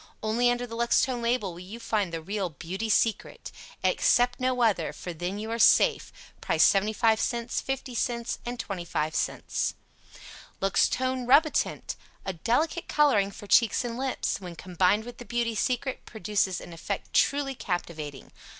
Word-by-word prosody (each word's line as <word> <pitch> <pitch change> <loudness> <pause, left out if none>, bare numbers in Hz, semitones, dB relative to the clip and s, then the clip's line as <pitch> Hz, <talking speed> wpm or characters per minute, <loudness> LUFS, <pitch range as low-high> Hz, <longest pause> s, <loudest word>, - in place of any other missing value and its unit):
ONLY 230 +3 +2
under 245 0 0
the 230 -1 -8
Luxtone 235 +1 +2
label 235 -5 0
will 170 - -10
you 195 +6 -9
find 215 -5 -1
the 165 -1 -5
REAL 195 +1 -2
"Beauty 180 +8 -5
Secret." 220 0 0 0.3
Accept 245 0 +3
NO 255 0 0
other, 195 -8 +1
for 175 - -7
THEN 175 +4 -4
YOU 220 +2 -5
ARE 230 - -2
SAFE, - - +4 0.3
Price - - +4
75c, 220 +3 +1
50c, 245 -2 -3
25c. 170 -7 -2 0.9
LUXTONE 255 +6 +1
RUBITINT. 295 +4 +2 0.3
A 190 - -2
delicate 275 - 0
coloring 265 -10 +3
for 205 - -11
cheeks 230 +3 +3
and 235 -1 -3
lips; 260 -5 -2
when 175 -2 -8
combined 185 +4 +1
with 245 0 -10
the - - -7
"Beauty 235 -1 -1
Secret," 255 +4 -1
produces 210 -4 -1
an 175 - -10
effect 165 - -5
truly 280 -1 +2
captivating. 160 - -5
225 Hz, 140 wpm, -27 LUFS, 190-245 Hz, 0.9 s, SAFE